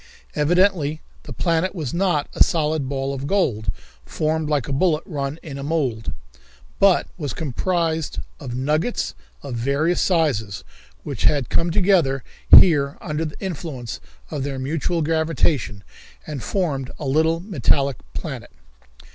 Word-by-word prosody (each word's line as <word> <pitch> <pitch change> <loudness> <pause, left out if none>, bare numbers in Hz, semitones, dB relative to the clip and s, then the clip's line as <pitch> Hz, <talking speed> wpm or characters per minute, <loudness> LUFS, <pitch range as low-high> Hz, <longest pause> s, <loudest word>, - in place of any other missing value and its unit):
Evidently 160 -1 +2 0.2
the - - -11
planet 170 +2 0
was 150 -8 -3
not 175 -5 +1
a - - +6
solid 155 -4 0
ball 135 0 -2
of 135 +1 -4
gold, 110 - +1 0.3
formed 155 0 -1
like 145 -3 0
a 140 - -2
bullet 155 +1 +2
run 140 -2 -3
in 140 -4 -7
a - - -5
mould, 140 -8 -1 0.7
but 195 -2 +5
was 145 -6 -3
composed 160 +2 -1 0.2
of 125 -5 -5
nuggets 150 - 0 0.3
of 140 -3 -5
various 140 +8 +1
sizes, 135 - +1 0.4
which - - -3
had 145 -4 +3
come 170 - +2
together 170 - +3 0.3
here 145 -5 +5
under 155 -1 -3
the 150 - -7
influence 140 - -5 0.3
of - - -3
their 140 -1 -3
mutual 155 +5 -1
gravitation, 155 -9 0 0.4
and 145 -4 -5
formed 140 - -1
a 150 - -6
little 160 +4 +2
metallic 140 - +1 0.2
planet. - - -5
150 Hz, 140 wpm, -22 LUFS, 135-165 Hz, 0.7 s, a